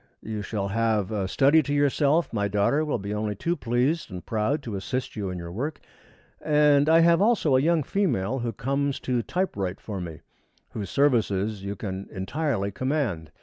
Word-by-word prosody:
You 110 Hz, -1 st, -4 dB
shall 100 Hz, -1 st, -3 dB
have 110 Hz, -1 st, 0 dB
a 100 Hz, -3 st, -1 dB
study 140 Hz, +9 st, +4 dB
to 145 Hz, -1 st, -5 dB
yourself, 145 Hz, +2 st, +2 dB
my 100 Hz, -2 st, 0 dB
daughter 105 Hz, +9 st, +2 dB
will 150 Hz, -4 st, -1 dB
be 100 Hz, 0 st, -5 dB
only 105 Hz, 0 st, -2 dB
too 170 Hz, -, -1 dB
pleased 125 Hz, +5 st, 0 dB
and 90 Hz, -2 st, -8 dB
proud 115 Hz, +7 st, -1 dB
to 115 Hz, -5 st, -5 dB
assist 125 Hz, +7 st, -3 dB
you 100 Hz, -3 st, -3 dB
in 90 Hz, -, -4 dB
your 85 Hz, -1 st, -7 dB
work, 140 Hz, -, -4 dB, 0.6 s
and 150 Hz, -1 st, +4 dB
I 165 Hz, +1 st, +6 dB
have 170 Hz, +1 st, +5 dB
also 205 Hz, -, +3 dB
a 130 Hz, -, +4 dB
young 165 Hz, +1 st, +2 dB
female 135 Hz, -, 0 dB
who 120 Hz, -1 st, -2 dB
comes 140 Hz, +5 st, -1 dB
to 125 Hz, -2 st, 0 dB
type 185 Hz, +10 st, -2 dB
write 95 Hz, -2 st, -3 dB
for 100 Hz, -4 st, -6 dB
me, 85 Hz, -3 st, -7 dB, 0.5 s
whose 105 Hz, -3 st, -5 dB
services 110 Hz, -7 st, +1 dB
you 100 Hz, +1 st, -4 dB
can 95 Hz, -1 st, -5 dB
entirely 100 Hz, +1 st, -2 dB
command. 115 Hz, -, -2 dB
115 Hz, 190 wpm, -26 LUFS, 100-145 Hz, 0.6 s, I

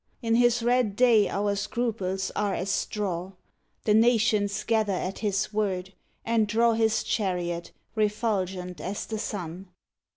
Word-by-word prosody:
In 225 Hz, 0 st, +1 dB
his 240 Hz, 0 st, +3 dB
red 240 Hz, -4 st, +2 dB
day 230 Hz, -3 st, +5 dB
our 200 Hz, 0 st, 0 dB
scruples 200 Hz, -3 st, -2 dB
are 205 Hz, -2 st, 0 dB
as 195 Hz, +2 st, -2 dB
straw: 190 Hz, -3 st, -2 dB, 0.5 s
The 210 Hz, -, +3 dB
nations 220 Hz, -3 st, +3 dB
gather 220 Hz, -3 st, +1 dB
at 185 Hz, +1 st, -3 dB
his 205 Hz, 0 st, -1 dB
word, 190 Hz, -3 st, -1 dB, 0.3 s
and 225 Hz, -2 st, +2 dB
draw 230 Hz, +2 st, +3 dB
His 225 Hz, 0 st, +2 dB
chariot, 175 Hz, -5 st, -2 dB, 0.2 s
refulgent 195 Hz, -6 st, -1 dB
as 195 Hz, +3 st, -4 dB
the 220 Hz, -1 st, -4 dB
sun. 185 Hz, -2 st, -5 dB
205 Hz, 135 wpm, -27 LUFS, 190-225 Hz, 0.5 s, day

